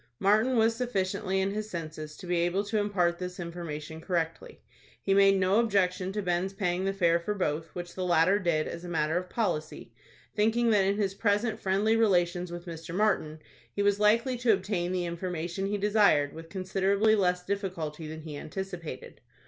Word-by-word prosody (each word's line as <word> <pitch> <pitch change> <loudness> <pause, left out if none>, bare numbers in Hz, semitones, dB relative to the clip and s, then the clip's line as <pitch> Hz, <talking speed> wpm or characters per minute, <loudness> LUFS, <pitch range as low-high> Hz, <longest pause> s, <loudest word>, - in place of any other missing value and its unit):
Martin 215 - +3
was 225 0 +3
sufficiently 195 -4 -1
in 190 +1 0
his 215 +1 -4
senses 155 -3 -6
to 190 - -10
be 175 0 0
able 175 +4 +1
to 210 +1 -1
impart 180 -4 +1
this 180 0 -6
information 160 -2 -6
correctly. 165 -2 -3 0.4
He 195 - 0
made 195 0 +5
no 190 +3 +3
objection 190 -4 +1
to 210 0 -2
Ben's 180 +2 -1
paying 185 -2 -1
the 195 - +1
fare 170 -3 +2
for 205 +5 -3
both, 160 -4 -1
which 175 -1 -6
the 185 - -4
latter 180 +3 +3
did, 170 -5 0
as 170 - -6
a 175 - -7
matter 160 -1 0
of 180 0 -2
policy, 175 -9 -3 0.4
thinking 225 +2 +2
that 200 -3 +4
in 200 +1 +1
his 200 -2 0
present 210 +2 0
friendly 200 +4 +2
relations 180 -5 +2
with 175 0 -7
Mr. 165 0 -7
Martin 185 -7 0 0.3
he 200 - 0
was 205 0 +2
likely 230 +4 +3
to 240 -2 +4
obtain 190 -2 -1
the 180 -1 -1
information 175 +2 -3
he 205 +1 -1
desired, 200 -9 +3
with 165 0 -10
considerably 195 +3 +2
less 180 -3 +1
difficulty 170 -6 -4
than 160 +1 -7
he 155 -2 -8
anticipated. 180 +2 -7
185 Hz, 185 wpm, -29 LUFS, 170-205 Hz, 0.4 s, made